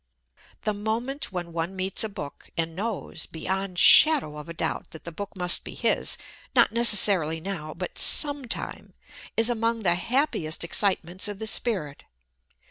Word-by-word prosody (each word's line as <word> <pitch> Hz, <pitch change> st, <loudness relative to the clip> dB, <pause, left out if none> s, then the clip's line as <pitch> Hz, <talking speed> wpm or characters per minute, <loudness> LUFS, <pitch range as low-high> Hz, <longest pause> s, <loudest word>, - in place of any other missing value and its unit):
The 215 Hz, -, -1 dB
moment 225 Hz, +7 st, -3 dB
when 175 Hz, -2 st, -6 dB
one 170 Hz, +3 st, -3 dB
meets 190 Hz, +2 st, -2 dB
a 220 Hz, -, -3 dB
book 165 Hz, -9 st, -9 dB
and 165 Hz, -1 st, -2 dB
knows, 200 Hz, -4 st, -5 dB
beyond 190 Hz, +2 st, -4 dB
shadow 275 Hz, -, +7 dB
of 165 Hz, +2 st, -9 dB
doubt, -, -, -3 dB
that 160 Hz, -, -12 dB
that 170 Hz, -, -7 dB
book 200 Hz, +5 st, -8 dB
must 180 Hz, -2 st, +1 dB
be -, -, -9 dB
his -, -, 0 dB, 0.4 s
not -, -, +5 dB
necessarily 200 Hz, -8 st, +3 dB
now, 160 Hz, -4 st, -6 dB
but 180 Hz, +2 st, -6 dB
some 290 Hz, -2 st, +3 dB
time -, -, -6 dB, 0.4 s
is 225 Hz, 0 st, +5 dB
among 230 Hz, -1 st, -1 dB
the 175 Hz, -4 st, +3 dB
happiest 180 Hz, -, -1 dB
excitements 185 Hz, 0 st, 0 dB
of 205 Hz, -1 st, -6 dB
the 220 Hz, -, -6 dB
spirit. 190 Hz, -, 0 dB
190 Hz, 155 wpm, -25 LUFS, 170-220 Hz, 0.4 s, shadow